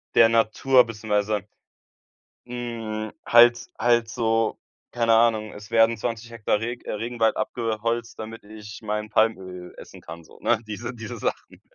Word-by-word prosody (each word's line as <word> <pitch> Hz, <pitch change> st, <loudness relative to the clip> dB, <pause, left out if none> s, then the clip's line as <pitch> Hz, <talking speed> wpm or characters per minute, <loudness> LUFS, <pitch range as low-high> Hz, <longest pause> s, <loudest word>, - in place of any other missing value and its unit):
der 115 Hz, -1 st, +7 dB
Natur 115 Hz, +3 st, +4 dB
beziehungsweise 105 Hz, -2 st, -2 dB, 1.0 s
hm, 115 Hz, -3 st, -5 dB
halt 120 Hz, 0 st, +6 dB
halt 120 Hz, -1 st, +3 dB
so 115 Hz, -1 st, 0 dB, 0.4 s
keine 115 Hz, -1 st, +2 dB
Ahnung, 110 Hz, -2 st, +2 dB
es 105 Hz, +1 st, -12 dB
werden 115 Hz, 0 st, +4 dB
20 115 Hz, +1 st, -4 dB
Hektar 105 Hz, -2 st, 0 dB
Reg 120 Hz, +2 st, -5 dB
äh, -, -, -4 dB
Regenwald 115 Hz, +1 st, 0 dB
abgeholzt, 115 Hz, 0 st, -2 dB
damit 110 Hz, +1 st, -8 dB
ich 105 Hz, 0 st, -11 dB
mein 105 Hz, 0 st, -3 dB
Palmöl 95 Hz, -5 st, -1 dB
essen -, -, -12 dB
kann 85 Hz, +1 st, -10 dB
so, -, -, -18 dB
ne, -, -, +2 dB
diese 110 Hz, +3 st, -5 dB
diese 115 Hz, -3 st, -7 dB
Sachen. -, -, -4 dB
115 Hz, 145 wpm, -24 LUFS, 105-115 Hz, 1.0 s, der